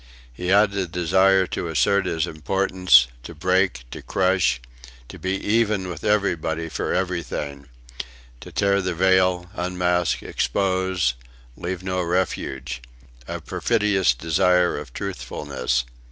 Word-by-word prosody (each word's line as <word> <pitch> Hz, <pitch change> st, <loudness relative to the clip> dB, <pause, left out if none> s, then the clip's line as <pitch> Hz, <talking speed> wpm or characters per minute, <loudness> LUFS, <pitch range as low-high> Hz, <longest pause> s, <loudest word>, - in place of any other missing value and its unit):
He 90 Hz, +8 st, -6 dB
had 100 Hz, +2 st, +4 dB
a 95 Hz, -2 st, -1 dB
desire 95 Hz, +3 st, +3 dB
to 90 Hz, -, -4 dB
assert 85 Hz, +6 st, +2 dB
his 80 Hz, -2 st, 0 dB
importance, 90 Hz, -5 st, +3 dB, 0.2 s
to 60 Hz, -, -10 dB
break, 90 Hz, -4 st, +1 dB
to -, -, -7 dB
crush; 90 Hz, -9 st, +1 dB, 0.5 s
to -, -, -10 dB
be 95 Hz, 0 st, -2 dB
even 105 Hz, -2 st, +1 dB
with 80 Hz, -3 st, -7 dB
everybody 85 Hz, -6 st, 0 dB
for -, -, -3 dB
everything; 85 Hz, -6 st, -3 dB, 0.7 s
to -, -, -11 dB
tear 100 Hz, 0 st, +2 dB
the 90 Hz, -2 st, -2 dB
veil, 90 Hz, 0 st, +2 dB
unmask, 90 Hz, -2 st, 0 dB
expose, 95 Hz, -7 st, 0 dB, 0.4 s
leave 90 Hz, +1 st, -5 dB
no 90 Hz, -1 st, -1 dB
refuge 90 Hz, -7 st, -2 dB, 0.5 s
a -, -, -5 dB
perfidious 105 Hz, -, +1 dB
desire 90 Hz, +5 st, +2 dB
of 75 Hz, -3 st, -7 dB
truthfulness! 60 Hz, 0 st, -3 dB
90 Hz, 125 wpm, -23 LUFS, 80-95 Hz, 0.7 s, had